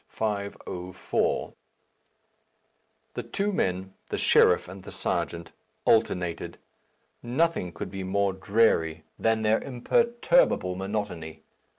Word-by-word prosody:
504." 100 -4 -2 1.6
The - - -3
two 205 +1 -2
men, 95 - -1 0.2
the - - -2
sheriff 90 - +4
and 95 +2 -9
the - - -10
serjeant, 85 -1 -2 0.3
alternated. 90 -6 +1 0.6
Nothing 130 - 0
could 95 +1 -6
be 95 0 -5
more 100 +1 +1
dreary 95 -5 +2 0.2
than 115 -1 +2
their 110 +1 +3
imperturbable 235 - +2
monotony. 95 -4 -4
100 Hz, 95 wpm, -27 LUFS, 90-115 Hz, 1.6 s, sheriff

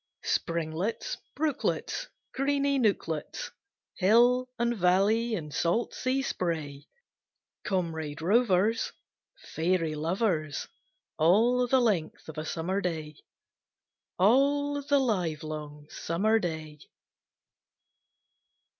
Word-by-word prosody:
Springlets, 170 +5 -2 0.2
brooklets, 305 -2 -1 0.3
Greeny 280 0 +1
nooklets, 205 - -1 0.5
Hill 240 +6 +4
and 235 0 +1
Valley, 210 +5 +2
and 150 -6 -6
salt 175 +8 0
sea 260 +1 -1
spray, 155 - -3 0.8
Comrade 160 -6 -2
rovers, 210 +3 +2 0.6
Fairy 165 -1 +1
lovers, 160 -1 -1 0.5
All 230 +10 +4
the 260 +2 +4
length 205 -10 0
of 160 -1 -6
a 155 - -4
Summer 185 +4 -2
day 160 -4 -3 1.0
All 285 +7 +3
the 285 0 +2
livelong 155 - -2
Summer 215 +7 +1
day! 160 -5 -5
185 Hz, 85 wpm, -28 LUFS, 160-240 Hz, 1.0 s, Hill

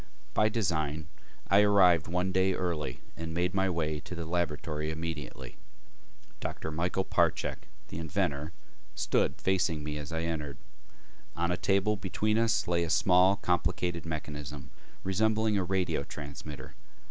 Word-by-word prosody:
By 110 - +4
design, 80 -8 -1 0.4
I 100 +2 +6
arrived 95 -5 +5
one 90 +2 0
day 95 0 +3
early 75 -8 -2
and 80 0 -5
made 90 +1 +1
my 95 0 +2
way 80 -3 -1
to 85 +5 -8
the 85 -1 -4
laboratory 80 -2 -1
immediately. 80 -2 -5 0.8
Dr. 80 - -4
Michael 90 +4 0
Parchak, - - +1 0.2
the - - -5
inventor, 75 -1 -1 0.4
stood - - +1
facing 90 -5 +1
me 75 0 -3
as 75 +3 -6
I 80 0 -1
entered. 75 -4 -3 0.8
On 85 +1 0
a - - +2
table 100 +3 +2
between 105 +3 0
us 115 -1 +2
lay 85 -1 +2
a 85 - -2
small 90 +3 +5
complicated 90 -2 0
mechanism 75 -3 -5 0.3
resembling 110 +2 +2
a 95 - +2
radio 95 0 0
transmitter. 70 -2 -8
85 Hz, 140 wpm, -30 LUFS, 75-95 Hz, 0.8 s, I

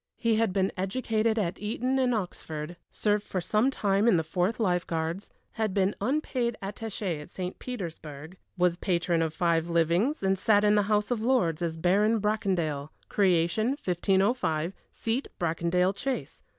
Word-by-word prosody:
He 230 -2 +2
had 225 -3 +2
been 190 0 +1
educated 220 +3 0
at 185 -5 -1
Eton 250 +5 0
and 255 -1 +2
Oxford, 165 -5 -5
served 210 -1 0
for 190 - -3
some 215 +8 +2
time 205 -4 +1
in 200 - +5
the 160 - +1
Fourth 180 +7 -1
Lifeguards, 175 -2 -1 0.4
been 195 +1 +2
unpaid 250 -1 0
attaché 195 -4 -4
at 150 - -11
St. 185 0 -5
Petersburg, 160 - -7 0.2
was 180 -1 +2
patron 170 -2 +1
of 160 -1 0
five 170 -1 +1
livings, 170 - +1
and 190 -1 +2
sat 205 0 +4
in 210 0 +5
the 210 - +4
House 210 +2 +1
of 235 -3 0
Lords 225 -11 +2
as 165 -1 -2
Baron 205 +6 +3
Bracondale; 185 -9 -1 0.2
creation, 195 +7 +2
1505; 190 -2 +1 0.2
seat, 230 +4 -2
Bracondale 170 +2 +1
Chase. 255 +6 -4
195 Hz, 150 wpm, -28 LUFS, 170-220 Hz, 0.4 s, in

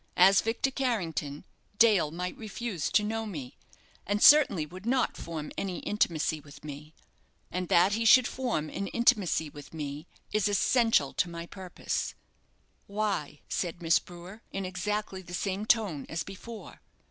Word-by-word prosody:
As 190 +2 +7
Victor 230 +4 0
Carrington, 170 - -2 0.3
Dale 210 -9 +5
might 180 +3 -4
refuse 215 -5 -4
to 210 - +4
know 225 +1 -2
me, 145 -11 -7 0.5
and 205 +1 +1
certainly 240 - +7
would 185 +7 -10
not 255 0 +1
form 160 -3 -6
any 185 -3 -3
intimacy 160 -6 0
with 145 -1 -15
me, 150 +2 -9 0.6
and 180 0 -2
that 180 +4 +5
he 225 +2 0
should 245 +3 +7
form 240 -12 -2
an 195 - -3
intimacy 210 -9 +2
with 145 +2 -12
me 150 +1 -5 0.2
is 210 -1 +2
essential 215 - +3
to 180 - 0
my 170 0 -6
purpose." 185 0 -4 0.7
"Why?" 200 -8 -2
said 175 -2 -3
Miss 165 0 +4
Brewer, 180 +5 -12
in 195 -1 -3
exactly 190 +1 -3
the 180 -1 -7
same 195 +3 -2
tone 195 - +1
as 160 -2 -2
before. 215 +4 -10
185 Hz, 150 wpm, -29 LUFS, 160-215 Hz, 0.7 s, As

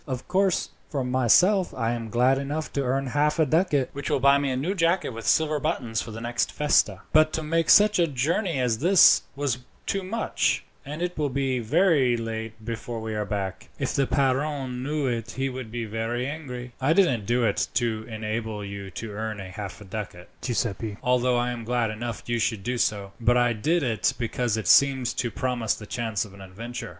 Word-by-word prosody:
Of 130 -2 -5
course, 190 0 +1 0.2
for 140 -4 -2
myself, 130 - +3
I 115 -2 0
am 115 -2 -4
glad 125 +4 +3
enough 145 +3 -4
to 140 - 0
earn 135 +1 0
half 145 +4 +1
a 160 - +4
ducat, 150 -3 +2
which 140 0 -4
will - - +1
buy 140 +1 +5
me 140 -1 -1
a 130 - -1
new 160 +9 -1
jacket 175 0 +1
with 115 -1 -7
silver 155 -1 +3
buttons 125 -8 -1
for - - -8
the 110 0 -7
next 120 +1 -1
festa; 150 0 +2
but 155 0 +5
to 160 - -2
make 165 +1 0
such 210 -2 +6
a 170 - +4
journey 160 - 0
as 120 -4 0
this 180 +4 +6
was 135 -3 -1 0.3
too 195 - -1
much, 215 +5 0 0.2
and 150 +5 -5
it 180 0 -2
will 145 -2 +1
be 135 -1 -1
very 135 - +3
late 110 -1 -6
before 115 0 -4
we 110 0 -4
are 105 -1 -2
back. 100 -3 -4
If - - -2
the 135 -1 +1
padrone 135 -1 0
knew 145 +2 -1
it 115 -3 -2
he 135 +1 0
would 130 -3 -6
be 120 0 -4
very 115 +3 -2
angry." 130 -4 -6
"I 140 +5 +3
didn't 145 - +2
do 120 +1 +2
it 115 - +1
to 115 -2 0
enable 110 -1 -4
you 100 -1 -7
to 110 +3 -7
earn 110 +1 -4
half 100 +1 -7
a - - -10
ducat, 95 -3 -7
Giuseppi, 110 -3 -2
although 125 0 +2
I 120 +1 0
am 120 -1 -5
glad 120 -1 0
enough 115 +2 -5
you 120 0 -1
should 110 -3 -1
do 125 +3 -2
so; 100 -3 0
but 120 +2 +4
I 120 -1 +3
did 155 +10 +1
it 110 -7 0
because 120 -1 -1
it 110 -5 -3
seemed 135 0 +4
to 120 - 0
promise 120 -1 -1
the 105 - -10
chance 110 -3 -2
of 100 - -14
an 100 - -13
adventure. 110 +6 -7
125 Hz, 210 wpm, -25 LUFS, 110-145 Hz, 0.3 s, such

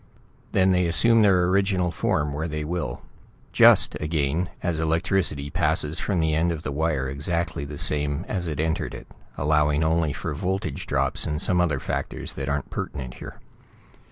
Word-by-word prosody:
Then 95 0 +3
they 90 -1 +2
assume 115 +7 +4
their 95 -4 +4
original 95 -1 +1
form 75 -3 -1
where 80 +3 -3
they 75 -1 -4
will 75 -6 -4 0.5
just, - - +6
again, 75 +2 -1
as 85 -2 -1
electricity 80 -3 0
passes 80 -2 0
from 95 -4 -1
the 80 -1 +1
end 80 +2 +1
of 80 -2 -5
the - - -3
wire 75 -2 -1
exactly 70 +2 -2
the 75 +1 -8
same 75 +4 0
as 90 -4 -3
it 75 -3 -4
entered 80 +1 -1
it, - - -9 0.3
allowing 75 +1 +2
only 80 -1 +1
for 75 - -4
voltage 90 -2 -3
drops - - +2
and 75 -1 -2
some 90 +2 +2
other 75 -6 0
factors - - -4
that 70 -1 -4
aren't 70 -1 -3
pertinent 65 -3 -5
here. - - -10
80 Hz, 170 wpm, -24 LUFS, 75-90 Hz, 0.5 s, just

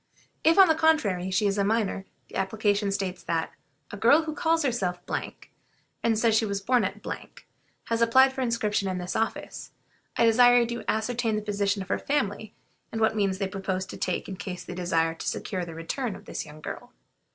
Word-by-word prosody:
If, 325 +3 +5
on 385 -1 +9
the 320 - +5
contrary, 265 - +2
she 190 +3 +1
is 200 0 +1
a - - +3
minor, 205 -2 0 0.2
the - - -13
application 205 +1 0
states 190 -2 -3
that 165 -1 -2 0.4
"a 205 - -6
girl 285 +10 +5
who 315 -1 -4
calls 325 +1 +1
herself, 195 -9 -1 1.0
and 225 -1 +2
says 225 0 +3
she 220 - +3
was 200 -2 -1
born 245 +5 +2
at, - - -2 0.9
has 230 0 -1
applied 260 +3 +5
for 265 - -4
inscription 220 -5 0
in 185 - -2
this 180 0 -4
office. 225 - -3 0.5
I 235 - +4
desire 245 +2 +6
you - - +2
to - - -11
ascertain 225 0 0
the 215 - -2
position 200 -1 0
of 185 - -16
her - - 0
family, 220 -7 -1 0.4
and 225 - -3
what 220 0 +2
means 195 -3 +1
they 195 0 -1
propose 190 -1 -3
to - - -9
take 185 - -2
in 190 - -6
case 185 -2 -6
they - - -7
desire 165 -2 0
to 165 - -7
secure 185 -4 -3
the 165 -1 -9
return 200 - -3
of - - -13
this - - -5
young 155 +1 -12
girl." - - -8
210 Hz, 205 wpm, -27 LUFS, 190-235 Hz, 1.0 s, on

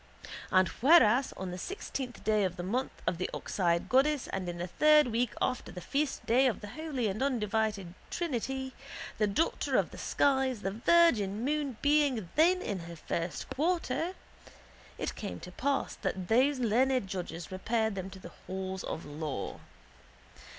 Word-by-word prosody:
And 185 -1 +4
whereas 260 - +5
on 185 -1 -4
the 180 - -6
sixteenth 270 - -5
day 215 -1 +2
of 185 -2 -1
the 175 - -5
month 245 +8 -3
of 170 - -1
the 185 - -1
oxeyed 170 -3 0
goddess 275 +2 +3
and 185 -2 -3
in 175 - -5
the 175 - -3
third 300 - +5
week 235 +1 +1
after 255 - -1
the 180 - -7
feastday 265 0 +1
of 245 - -1
the 205 - -7
Holy 285 -3 -2
and 205 +3 -3
Undivided 220 -7 0 0.2
Trinity, 265 -4 -3 0.5
the 210 - +3
daughter 205 +12 +1
of - - +1
the - - -10
skies, 265 -5 +1
the 195 - -1
virgin 230 - +3
moon 285 -4 -1
being 285 - +2
then 360 +4 +4
in 200 -3 -3
her 170 - -7
first 170 +1 -3
quarter, 330 +2 0 0.8
it - - -3
came 205 - -6
to 180 - -9
pass 275 +8 -1
that 185 -2 -3
those 260 +5 +4
learned 255 +1 +2
judges 175 -3 -5
repaired 220 +3 0
them 190 -1 -5
to 190 - -11
the 185 - -11 0.2
halls 190 0 -4
of 160 - -5
law. 145 -6 -5
225 Hz, 165 wpm, -31 LUFS, 190-275 Hz, 0.8 s, whereas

